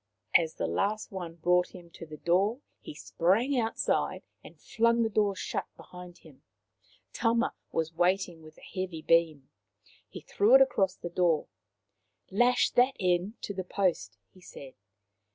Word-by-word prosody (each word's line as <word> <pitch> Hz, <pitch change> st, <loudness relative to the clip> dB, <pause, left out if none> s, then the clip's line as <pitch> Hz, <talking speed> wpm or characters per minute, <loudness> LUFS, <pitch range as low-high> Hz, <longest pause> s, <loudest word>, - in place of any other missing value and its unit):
As 165 Hz, -2 st, +3 dB
the -, -, -3 dB
last 215 Hz, +2 st, -2 dB
one 175 Hz, -4 st, -7 dB
brought 180 Hz, +2 st, +1 dB
him 175 Hz, -2 st, -13 dB
to 165 Hz, -, -11 dB
the 155 Hz, 0 st, -10 dB
door 195 Hz, -, +1 dB, 0.2 s
he -, -, -10 dB
sprang 200 Hz, -, 0 dB
outside 225 Hz, -1 st, -1 dB, 0.2 s
and -, -, -15 dB
flung 230 Hz, 0 st, +1 dB
the 225 Hz, -, -1 dB
door 205 Hz, -2 st, +1 dB
shut -, -, -4 dB
behind 180 Hz, -1 st, -12 dB
him. -, -, -19 dB, 0.7 s
Tama 235 Hz, +1 st, +1 dB, 0.2 s
was 160 Hz, 0 st, -2 dB
waiting 175 Hz, 0 st, 0 dB
with 155 Hz, 0 st, -15 dB
a -, -, -18 dB, 0.2 s
heavy 175 Hz, -4 st, -4 dB
beam. 160 Hz, -4 st, +1 dB, 0.6 s
He -, -, -9 dB
threw 435 Hz, +5 st, +3 dB
it -, -, +8 dB
across 195 Hz, -, 0 dB
the 175 Hz, -, -8 dB
door. 170 Hz, -3 st, +1 dB, 0.4 s
" 95 Hz, -, -44 dB
Lash 245 Hz, +5 st, +3 dB
that 250 Hz, +2 st, +3 dB
end 185 Hz, +3 st, 0 dB
to 200 Hz, -, -4 dB
the 190 Hz, -1 st, -4 dB
post," 175 Hz, -, -2 dB, 0.2 s
he 185 Hz, -, -19 dB
said. 140 Hz, -6 st, -12 dB
180 Hz, 160 wpm, -29 LUFS, 165-215 Hz, 0.7 s, it